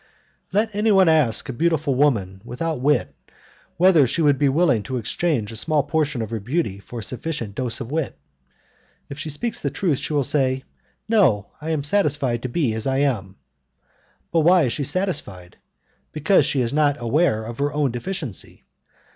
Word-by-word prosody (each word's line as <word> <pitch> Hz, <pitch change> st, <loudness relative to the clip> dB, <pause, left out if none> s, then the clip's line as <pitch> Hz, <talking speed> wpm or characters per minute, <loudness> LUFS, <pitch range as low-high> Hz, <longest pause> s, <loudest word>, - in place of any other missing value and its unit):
Let 215 Hz, +2 st, +1 dB
anyone 205 Hz, -3 st, +4 dB
ask 155 Hz, -8 st, +3 dB
a 130 Hz, -, -4 dB
beautiful 160 Hz, +1 st, +1 dB
woman 110 Hz, -9 st, +1 dB
without 140 Hz, +4 st, -4 dB
wit 140 Hz, -2 st, +1 dB, 0.6 s
whether 170 Hz, -6 st, +5 dB
she 165 Hz, +7 st, 0 dB
would 145 Hz, -3 st, +3 dB
be 145 Hz, -, +3 dB
willing 140 Hz, -6 st, +2 dB
to 130 Hz, +5 st, -4 dB
exchange 120 Hz, -1 st, -1 dB
a -, -, -8 dB
small 150 Hz, +5 st, +1 dB
portion 150 Hz, -4 st, -1 dB
of 110 Hz, -, -7 dB
her 115 Hz, -, -2 dB
beauty 110 Hz, -, -2 dB
for 115 Hz, +3 st, -8 dB
a -, -, -6 dB
sufficient 125 Hz, -3 st, -4 dB
dose 120 Hz, +1 st, -2 dB
of 125 Hz, +1 st, -6 dB
wit. 155 Hz, -, -2 dB, 0.9 s
If 140 Hz, -, -8 dB
she 155 Hz, -, -4 dB
speaks 215 Hz, +11 st, -3 dB
the 140 Hz, -, -1 dB
truth, 145 Hz, 0 st, -1 dB
she -, -, -4 dB
will 145 Hz, -2 st, +2 dB
say, 130 Hz, -1 st, 0 dB, 0.4 s
"No, 150 Hz, -, +2 dB
I 155 Hz, -, -5 dB
am 155 Hz, -3 st, -1 dB
satisfied 145 Hz, -, +1 dB
to 130 Hz, -, -4 dB
be 125 Hz, -3 st, 0 dB
as 110 Hz, +2 st, -3 dB
I 135 Hz, 0 st, +1 dB
am." 105 Hz, -10 st, -1 dB, 1.0 s
But 165 Hz, -, +3 dB
why 175 Hz, +2 st, +5 dB
is 125 Hz, -, 0 dB
she 145 Hz, -, -2 dB
satisfied? 115 Hz, -, -3 dB, 0.6 s
Because 155 Hz, 0 st, +3 dB
she 135 Hz, -, +1 dB
is 120 Hz, +1 st, -1 dB
not 145 Hz, -1 st, +2 dB
aware 120 Hz, -1 st, +1 dB
of 115 Hz, +2 st, -8 dB
her 145 Hz, +1 st, 0 dB
own 145 Hz, -3 st, 0 dB
deficiency. 135 Hz, -, -6 dB
140 Hz, 180 wpm, -22 LUFS, 120-160 Hz, 1.0 s, whether